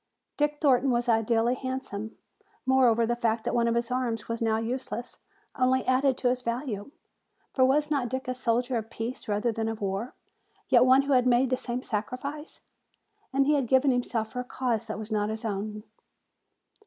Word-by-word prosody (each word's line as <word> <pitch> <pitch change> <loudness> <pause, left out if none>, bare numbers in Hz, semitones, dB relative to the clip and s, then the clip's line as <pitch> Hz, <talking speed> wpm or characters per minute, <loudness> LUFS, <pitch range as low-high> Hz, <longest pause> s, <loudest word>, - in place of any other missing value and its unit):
Dick 295 0 0
Thornton 270 -2 +3
was 240 -1 +1
ideally 225 +1 +2
handsome; 255 -5 -5 0.5
moreover, 245 -3 +4
the 240 +1 0
fact 230 -1 0
that - - -2
one 235 -1 +2
of 230 - +1
his 235 0 -1
arms 235 -3 -2
was 230 0 -4
now 220 -1 +2
useless 245 +1 -4 0.4
only 260 0 +2
added 260 0 +2
to 250 - +1
his 250 0 -1
value. 235 -2 -3 0.6
For 260 - +3
was 295 +3 +2
not 270 -5 0
Dick 260 +1 -4
a 255 - -1
soldier 245 0 0
of 220 0 -5
peace 230 +2 -5
rather 210 +3 0
than 225 0 -2
of 225 -1 -3
war, 200 +4 -3 0.5
yet 245 -1 +6
one 260 +2 +6
who 280 0 +1
had 250 -1 +4
made 250 +1 +3
the - - +4
same 250 0 -4
sacrifice? 255 +8 -4 0.7
And 275 0 +2
he 300 - +3
had 275 -4 +1
given 265 +2 +4
himself 235 -3 -1
for 250 - -5
a - - -2
cause 240 -3 -2
that 215 - -4
was 220 +1 -7
not 210 -1 0
his 220 +1 -3
own. 210 0 -3
245 Hz, 190 wpm, -27 LUFS, 225-260 Hz, 0.7 s, yet